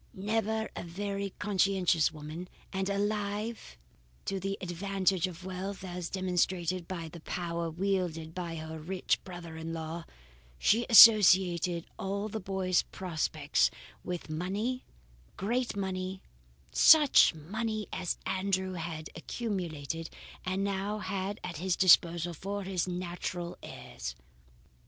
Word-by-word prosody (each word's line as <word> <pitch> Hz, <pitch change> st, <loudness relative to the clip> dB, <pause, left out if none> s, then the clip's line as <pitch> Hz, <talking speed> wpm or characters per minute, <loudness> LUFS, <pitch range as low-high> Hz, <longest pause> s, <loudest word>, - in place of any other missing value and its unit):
Never 220 Hz, +2 st, 0 dB
a -, -, -4 dB
very 200 Hz, +3 st, -3 dB
conscientious 190 Hz, -5 st, +2 dB
woman, 155 Hz, +3 st, -7 dB, 0.3 s
and 190 Hz, 0 st, -1 dB
alive 205 Hz, +2 st, -2 dB, 0.5 s
to 195 Hz, -, -2 dB
the 195 Hz, +1 st, -3 dB
advantages 190 Hz, 0 st, 0 dB
of 180 Hz, 0 st, -9 dB
wealth 190 Hz, +1 st, -5 dB
as 180 Hz, -2 st, -5 dB
demonstrated 180 Hz, -1 st, 0 dB
by 170 Hz, -3 st, -5 dB
the 170 Hz, +1 st, -10 dB
power 170 Hz, 0 st, -3 dB
wielded 170 Hz, -2 st, -1 dB
by 170 Hz, -2 st, -4 dB
her 160 Hz, 0 st, -6 dB
rich 180 Hz, +4 st, -1 dB
brother 175 Hz, -3 st, -8 dB
in 160 Hz, +1 st, -5 dB
law, 165 Hz, +1 st, -5 dB, 0.5 s
she 230 Hz, -, +3 dB
associated 185 Hz, -7 st, +8 dB
all 200 Hz, +2 st, -2 dB
the 220 Hz, -, -4 dB
boy's 185 Hz, -2 st, +1 dB
prospects 160 Hz, -4 st, 0 dB, 0.3 s
with 180 Hz, -1 st, -4 dB
money, 200 Hz, +11 st, -2 dB, 0.5 s
great 235 Hz, +5 st, -1 dB
money, 190 Hz, -1 st, -3 dB, 0.5 s
such 295 Hz, -, +7 dB
money 215 Hz, +6 st, -3 dB
as 180 Hz, -, -2 dB
Andrew 190 Hz, -1 st, 0 dB
had 165 Hz, -2 st, -5 dB
accumulated, 165 Hz, -, -4 dB, 0.3 s
and 185 Hz, +1 st, -1 dB
now 200 Hz, +1 st, -1 dB
had 195 Hz, 0 st, -3 dB
at 180 Hz, -3 st, -5 dB
his 180 Hz, +2 st, 0 dB
disposal 175 Hz, -2 st, +5 dB
for 200 Hz, +5 st, -4 dB
his 185 Hz, -2 st, -1 dB
natural 175 Hz, -1 st, -4 dB
heirs. 60 Hz, -1 st, -7 dB
185 Hz, 120 wpm, -31 LUFS, 170-200 Hz, 0.5 s, associated